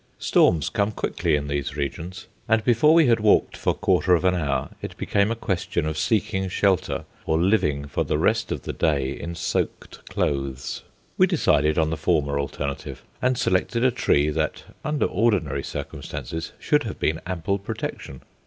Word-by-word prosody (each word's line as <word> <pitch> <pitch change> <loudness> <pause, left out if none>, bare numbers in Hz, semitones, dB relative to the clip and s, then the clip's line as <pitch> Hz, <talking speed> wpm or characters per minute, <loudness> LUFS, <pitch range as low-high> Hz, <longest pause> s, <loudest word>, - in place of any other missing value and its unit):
Storms 80 -1 +3
come 100 +1 0
quickly 100 - 0
in 70 -1 -2
these 70 0 -3
regions, 80 +6 -4 0.2
and 110 0 +3
before 125 +5 +4
we 165 -2 +6
had 115 -3 +4
walked 105 -1 +3
for - - 0
quarter 90 -1 +3
of 85 - -1
an 90 - +4
hour 75 -6 -1
it - - -7
became 100 +1 +1
a 115 - -1
question 90 -6 -2
of 80 0 -2
seeking 95 +1 0
shelter 85 -6 +1 0.2
or 80 - +2
living 80 -7 +2
for 70 - -1
the - - -1
rest - - +1
of - - -3
the - - -4
day 70 -4 +1
in 85 +4 -6
soaked - - -3
clothes. 70 -1 -2 0.4
We - - +6
decided 75 +2 +2
on 80 -1 +2
the 80 - -2
former 75 -3 +1
alternative, 70 0 -4 0.2
and 125 0 +2
selected 115 +7 +1
a 130 - +5
tree 75 -9 +2
that, 80 0 -2 0.2
under 150 -2 0
ordinary 90 - +1
circumstances, 80 +4 -6
should - - +2
have - - -5
been 80 +2 0
ample 95 +2 -1
protection. 70 -7 -6
85 Hz, 170 wpm, -24 LUFS, 70-100 Hz, 0.4 s, we